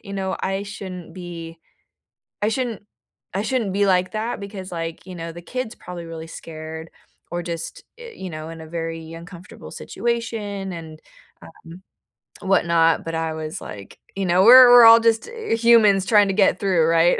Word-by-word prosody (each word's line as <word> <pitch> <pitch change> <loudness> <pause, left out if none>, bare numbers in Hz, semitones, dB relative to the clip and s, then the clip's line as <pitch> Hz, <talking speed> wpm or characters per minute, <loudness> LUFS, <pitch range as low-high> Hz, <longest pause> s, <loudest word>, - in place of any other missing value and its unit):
you 200 -2 -9
know, 190 -1 -2
"I 195 +1 -2
shouldn't 190 -3 -8
be 170 -2 -8 0.8
I 210 - +1
shouldn't 230 -3 -3 0.5
I 200 +2 -1
shouldn't 235 -7 -1
be 200 0 +2
like 185 -1 +2
that 220 +1 -3
because, 195 -2 -8
like, 165 +1 -5
you 185 -1 -9
know, 165 0 -6
the 175 +1 -10
kid's 245 +4 -5
probably 175 -1 -9
really 165 -1 -8
scared 160 0 -9 0.4
or 175 0 -2
just, 165 -1 -6
eh, 475 -1 -10
you 185 - -7
know, 155 0 -7
in 165 0 -9
a 160 - -10
very 165 0 -6
uncomfortable 175 +2 -11
situation 210 -5 -4
and, 160 -2 -10 0.4
um, - - -12 0.9
whatnot," 170 -4 +2
but 165 - -4
I 160 -1 -2
was 160 +3 -6
like, 100 -2 -10 0.2
you 195 - -2
know, 180 +1 +3
we're 250 +1 +10
we're 240 -1 +9
all 230 0 +9
just 225 -1 +1
humans 225 - +3
trying 210 -3 +5
to - - 0
get 200 - +3
through, 185 -5 +2
right? 165 +1 +3
185 Hz, 175 wpm, -22 LUFS, 165-210 Hz, 0.9 s, we're